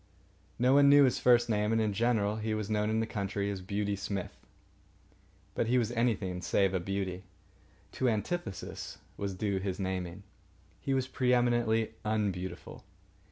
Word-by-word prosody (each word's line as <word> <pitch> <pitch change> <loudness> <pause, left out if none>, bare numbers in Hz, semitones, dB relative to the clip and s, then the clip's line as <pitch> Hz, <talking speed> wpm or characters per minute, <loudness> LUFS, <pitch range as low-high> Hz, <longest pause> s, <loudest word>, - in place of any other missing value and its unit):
No 125 +2 +3
one 140 0 +6
knew 145 0 +8
his 130 - +2
first 120 -1 +5
name, 105 -1 +1
and 115 - +2
in 110 -2 +1
general 110 -1 +1
he 110 0 -2
was 110 0 -3
known 105 0 +1
in 110 +1 +1
the - - 0
country 100 -2 -2
as 95 -2 -5
Beauty 100 +2 -2
Smith. 100 -1 -4 1.2
But - - -1
he 125 +2 +3
was 120 -2 +1
anything 105 -7 0
save 95 +2 +2
a 95 - +1
beauty. 95 0 -3 0.7
To 130 - +1
antithesis 115 - -4 0.2
was 100 -1 -4
due 100 0 -1
his 95 0 -3
naming. 95 0 -3 0.6
He 135 - -1
was 130 -1 0
pre 125 -1 +2
eminently 120 -2 +1
unbeautiful. 95 -5 -3
105 Hz, 160 wpm, -31 LUFS, 95-120 Hz, 1.2 s, knew